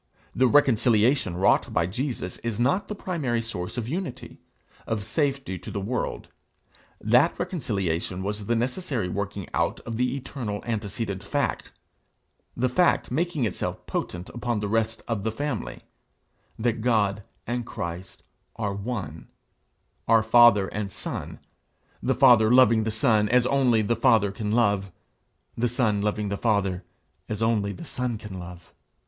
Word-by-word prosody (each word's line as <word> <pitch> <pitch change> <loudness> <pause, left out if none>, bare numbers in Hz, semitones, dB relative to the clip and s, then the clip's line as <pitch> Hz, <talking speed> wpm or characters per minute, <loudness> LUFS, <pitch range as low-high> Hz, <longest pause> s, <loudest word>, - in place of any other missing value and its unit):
The 130 +1 +4
reconciliation 120 -5 +3
wrought 95 - +3
by 85 - +2
Jesus 115 - -4
is 115 -2 -4
not 140 +12 +1
the 210 - -5
primary 150 -12 -2
source 90 -2 -5
of 115 -2 -2
unity, 160 -3 -5 0.5
of 110 -2 -2
safety 135 - -1
to - - -9
the 100 - -3
world; 110 +5 -3 0.7
that 125 +9 +3
reconciliation 95 - -2
was 105 0 -4
the 120 - +2
necessary 125 - -1
working 100 +1 -4
out - - 0
of 115 -2 -5
the 125 +1 0
eternal 125 -6 -5
antecedent 105 -3 -3
fact, 140 +8 -2 0.9
the 130 +2 +2
fact 175 +8 +2
making 165 -5 0
itself 105 - -4
potent 90 +1 -4
upon 120 -2 -2
the 105 - -2
rest 115 +1 -1
of 115 -4 -1
the 110 +2 -1
family 140 0 -4 0.7
that 115 0 0
God 105 -4 +2 0.2
and 120 0 -2
Christ 85 -3 -6 0.3
are 105 -3 -2
one, 100 -7 -5 0.8
are 115 -1 +5
father 110 -3 +6
and 105 -1 -4
son, - - -6 0.6
the - - +1
Father 120 -5 +6
loving 115 -3 +5
the - - 0
Son 110 -1 +2
as 125 0 +4
only 125 -5 +3
the 115 +3 +1
Father 115 -4 +3
can 105 +1 -3
love, 100 -4 +2 0.6
the 120 +1 +1
Son 115 -4 +1
loving 105 0 -1
the 100 - -2
Father 100 -5 0 0.5
as 110 0 -2
only 105 -3 +1
the 170 - -8
Son 125 -5 -3
can 105 -3 -8
love. 90 0 -11
115 Hz, 150 wpm, -26 LUFS, 100-125 Hz, 0.9 s, father